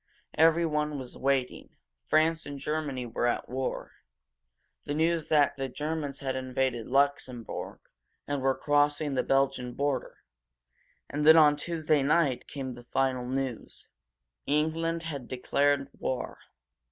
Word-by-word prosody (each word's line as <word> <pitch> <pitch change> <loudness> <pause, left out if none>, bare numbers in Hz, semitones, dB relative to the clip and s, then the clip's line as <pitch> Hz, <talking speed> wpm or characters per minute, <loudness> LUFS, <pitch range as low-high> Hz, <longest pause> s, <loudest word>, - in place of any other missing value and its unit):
Everyone 155 -2 +2
was 130 -2 -7
waiting. 135 -2 -1 0.3
France 160 +1 +2
and 145 -1 -6
Germany 145 -3 -3
were 120 +1 -1
at 120 - -1
war; 130 +1 -3 0.9
the 145 - -2
news 165 0 +1
came 155 - +4
that 145 -2 +3
the 135 -1 -3
Germans 150 +1 -3
had 135 -2 -3
invaded 130 -2 -1
Luxembourg, 135 -3 -1 0.5
and 145 -1 -2
were 135 0 +2
crossing 145 0 +2
the 130 - +2
Belgian 135 -2 +1
border. 140 -1 -2 0.9
And 145 +1 -3
then, 160 +2 +8
on 150 -2 +7
Tuesday 155 -1 0
night, 145 -2 +2
came 130 -3 -5
the 120 - -11
final 130 0 -1
news. 130 -2 -4 0.6
England 165 +3 0
had 140 -6 -5
declared 140 +2 +1
war. 130 - -3
140 Hz, 130 wpm, -29 LUFS, 130-150 Hz, 0.9 s, then